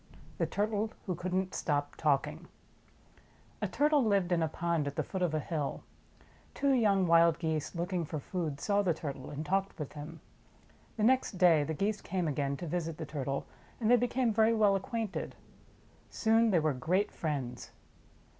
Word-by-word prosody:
iv; - - -20 0.2
THE - - +1
TURTLE 215 +1 -1
WHO 185 - -1
COULD 180 +2 -4
N'T 190 0 -1
STOP 145 -1 -1
TALKING 145 -3 0 1.1
A - - +1
TURTLE 295 -1 +3
lived 200 -5 +2
in 170 -1 +2
a 160 - +2
pond 165 -1 -1
at 140 - -4
the - - 0
foot 190 - -5
of 170 -3 +1
a - - +1
hill. 150 -2 -3 0.7
Two 280 0 +2
young 205 -6 +3
wild 170 -1 +5
Geese, 160 -1 -2
looking 175 +1 -1
for 155 0 -4
food, 155 -2 -4
saw 205 +4 +2
the 180 -5 +1
Turtle, 140 -4 -6
and 150 +2 -5
talked 195 +4 0
with 150 -3 -6
him. 150 +2 -8 0.8
The 215 - 0
next 255 +1 +3
day 170 -5 +5
the 160 +2 -3
Geese 205 +5 -1
came 180 -2 -2
again 140 -1 -1
to 175 - -6
visit 165 -1 -3
the 160 - -5
Turtle 140 -2 -3 0.3
and 225 -1 +2
they - - +9
became 245 -1 +1
very 220 +1 +4
well 210 -2 +4
acquainted. 215 +2 -3 0.7
Soon 225 +1 +3
they 180 -5 +4
were 155 -2 +1
great 175 +10 0
friends. 135 -6 -4
175 Hz, 185 wpm, -31 LUFS, 155-205 Hz, 1.1 s, they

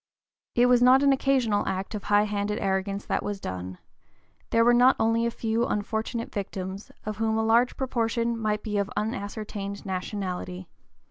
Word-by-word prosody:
It 240 - +5
was 250 -1 +5
not 255 +2 +6
an 280 -1 +5
occasional 260 -6 +2
act 190 +2 -3
of 210 - -5
high 205 0 +4
handed 210 0 -2
arrogance 195 +1 -1
that - - -1
was 205 -1 -4
done; 90 - -6 0.7
there 230 0 +3
were 240 - +6
not 250 +2 +6
only 225 +1 +2
a - - +1
few 230 0 -1
unfortunate 220 +3 -3
victims, 190 0 -5
of 215 -1 -4
whom 220 0 0
a 220 - +1
large 235 +3 +3
proportion 235 -2 0
might 215 -2 -1
be 210 -2 -1
of 200 0 -1
unascertained 205 -1 -4
nationality. 185 -1 -4
215 Hz, 165 wpm, -26 LUFS, 200-230 Hz, 0.7 s, not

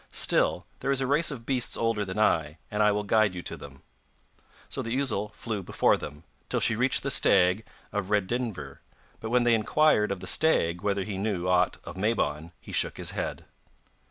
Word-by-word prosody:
Still, - - +2
there - - -3
is 135 -1 +1
a 135 - 0
race 145 +5 +2
of 125 -6 -6
beasts 125 -2 -1
older 115 -2 0
than 95 0 -6
I, 80 -7 +1
and 105 0 0
I 105 0 +5
will 105 0 -1
guide 105 -2 +2
you 90 - -6
to - - -5
them.' 70 -1 -12 0.8
So - - -3
the 115 +4 -2
ousel 105 -7 -1
flew 110 -4 -4
before 90 - +2
them, 75 +2 -8 0.3
till - - 0
she 115 - +2
reached 125 +4 +1
the 140 - -1
stag 95 0 +4 0.3
of 100 -2 -3
Redynvre; 105 - -2 0.4
but 110 - -5
when 125 +1 +3
they 120 -1 +4
inquired 110 -1 +3
of 100 - -3
the - - -8
stag 85 - +2
whether 100 -1 0
he 95 -1 -5
knew 95 -4 -2
aught 90 0 +2
of - - -9
Mabon 85 -7 -1
he - - -12
shook - - -1
his - - -3
head. - - -4
105 Hz, 200 wpm, -27 LUFS, 90-120 Hz, 0.8 s, I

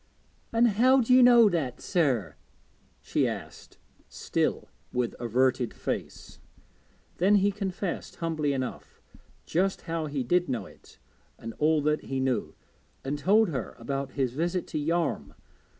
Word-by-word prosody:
'And 235 +1 +4
how 250 +5 +4
do 250 +1 +2
you 255 - +7
know 240 -2 +7
that, 160 -10 -1
sir?' 125 - 0 0.7
she - - +1
asked, - - -8 0.3
still - - -2 0.2
with 125 -2 -1
averted 125 +1 +1
face. - - -5 0.8
Then 195 +4 +4
he 200 0 +3
confessed, 195 -2 -4
humbly 155 -3 -1
enough, 130 -2 -5 0.5
just 190 +3 0
how 165 -2 -3
he 140 -3 -2
did 180 +7 +1
know 115 -6 -2
it, - - -17 0.4
and 115 0 -7
all 155 0 +2
that 150 +1 0
he 135 0 -3
knew, 130 -1 -1 0.5
and 145 +2 -3
told 205 +6 +4
her 130 -8 -4
about 135 -1 -4
his 130 -3 -1
visit 175 +5 -1
to 155 - -2
Yarm. 165 +2 -1
155 Hz, 140 wpm, -27 LUFS, 130-190 Hz, 0.8 s, you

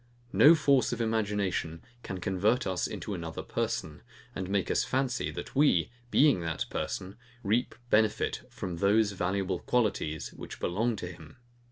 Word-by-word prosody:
No 160 +3 +8
force 140 -4 +3
of - - -3
imagination 105 -7 -1 0.2
can 95 -5 -6
convert 100 +7 +1
us 95 -2 -1
into - - -5
another - - -5
person, - - -3 0.3
and 95 -1 -4
make 100 -2 0
us - - +2
fancy, 130 -1 -1
that - - -7
we, 130 - +3 0.2
being 140 -5 +5
that 80 -2 -2
person, 95 +3 -4 0.3
reap 110 +5 +1 0.2
benefit 110 0 +2
from 90 -2 -5
those 105 +3 +3
valuable 95 -1 -1
qualities, 100 -10 -1
which - - -9
belong 110 +6 0
to 95 -3 -5
him. 90 - -14
100 Hz, 150 wpm, -29 LUFS, 90-120 Hz, 0.3 s, No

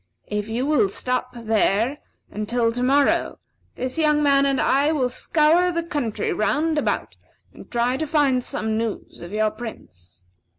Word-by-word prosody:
If 210 +1 -4
you 240 +4 -1
will 270 -9 +2
stop 250 +4 -2
there 225 +3 +1 0.3
until 230 +2 0
to 245 +2 -3
morrow, 275 +3 +2 0.4
this 255 +5 -3
young 300 -1 +3
man 280 -1 +4
and 275 -1 +1
I 280 +3 +2
will 260 -6 0
scour 325 +6 +2
the 335 -1 -2
country 290 - -2
round 305 +8 +1
about, - - -2 0.4
and - - -14
try 245 +2 0
to 315 - -3
find 280 -4 +2
some 220 -1 -2
news 225 -2 -5
of 175 +1 -9
your 215 0 +1
Prince. 90 - -11
250 Hz, 160 wpm, -23 LUFS, 220-295 Hz, 0.4 s, man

